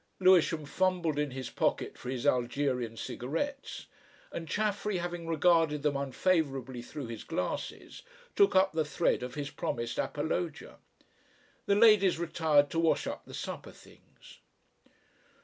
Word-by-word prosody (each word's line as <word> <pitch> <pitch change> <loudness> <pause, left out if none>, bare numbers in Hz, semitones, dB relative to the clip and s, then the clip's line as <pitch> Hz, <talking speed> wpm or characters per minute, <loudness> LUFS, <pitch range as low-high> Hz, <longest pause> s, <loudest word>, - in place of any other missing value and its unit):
Lewisham 175 -4 +4
fumbled 175 -1 0
in 150 -1 0
his 130 -1 -6
pocket - - 0
for - - -8
his 130 0 -3
Algerian 125 -2 0
cigarettes, 165 - -4 0.5
and 165 - -6
Chaffery 210 0 -1
having 175 -1 -4
regarded 165 -2 +3
them 150 -2 +1
unfavourably 135 -3 0
through 140 +3 -7
his 115 -2 -7
glasses, - - -4 0.3
took 400 -1 +4
up 190 +1 +5
the 160 -1 +1
thread 150 0 0
of 125 0 -6
his 145 -1 -4
promised 115 0 -3
apologia. 160 +3 -3 0.9
The 200 - +4
ladies 205 -5 +6
retired 160 -4 +2
to 165 - 0
wash 165 -1 +2
up - - -5
the - - -8
supper - - -6
things. - - -18
155 Hz, 135 wpm, -30 LUFS, 135-180 Hz, 0.9 s, ladies